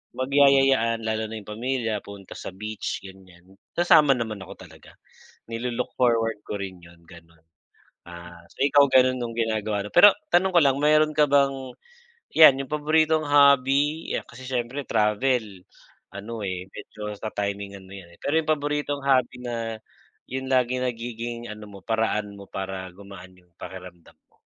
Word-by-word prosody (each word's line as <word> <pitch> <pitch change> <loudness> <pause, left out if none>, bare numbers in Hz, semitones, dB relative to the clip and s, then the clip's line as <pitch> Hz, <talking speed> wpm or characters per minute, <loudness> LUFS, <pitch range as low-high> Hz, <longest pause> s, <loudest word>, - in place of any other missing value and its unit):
magyayayaan 135 -4 +3
lalo 110 0 -1
na 110 0 -6
yung 100 - -16
pamilya 115 -1 -2
punta 100 -2 -11
sa - - -7
beach, 110 +1 -5
ganyan, 95 -1 -15 0.2
sasama 155 -4 +5
naman 110 -4 -4
ako - - -11
talaga, - - -17 0.6
nilu-look 120 +1 -3
forward 115 -3 +2
ko 105 - -4
rin 95 -2 -8
yun, 85 0 -16
ganun. 85 -2 -17 0.7
Ah, 85 0 -11
so, - - -23
ikaw 145 0 +5
ganun 130 0 +4
yung 115 - -4
ginagawa 110 -3 -1
mo? - - -14
Pero 200 +3 +9 0.2
tanong 190 +2 +4
ko - - +8
lang 135 -2 +3
meron 155 +1 +3
ka 150 - +4
bang, 140 -1 +3 0.8
yan, 135 -4 +8
yung 135 - -13
paboritong 155 +1 +2
hobby 140 +2 +3
ya - - -1
kasi 130 +2 -13
syempre 125 +3 -3
travel, 105 -2 0 0.5
ano, 110 +3 -7
eh, 95 -1 -5
medyo 105 0 -8
ta-timingan 100 -2 -5
mo 95 - -11
yan 85 -3 -14
eh, - - -55
pero 150 +3 0
yung 155 -1 -5
paboritong 145 -1 -3
hobby 130 -3 +2
na 120 -1 -4 0.7
yung 130 0 -4
lagi 125 0 +2
nagiging, 120 -1 -5
ano 105 0 -9
mo, 100 -1 -12
paraan 105 -2 -1
mo 100 - -11
para 95 -1 -5
gumaan 95 -2 -13
yung 90 -1 -25
pakiramdam 90 -2 -11 0.2
mo? - - -33
115 Hz, 160 wpm, -24 LUFS, 100-135 Hz, 0.8 s, Pero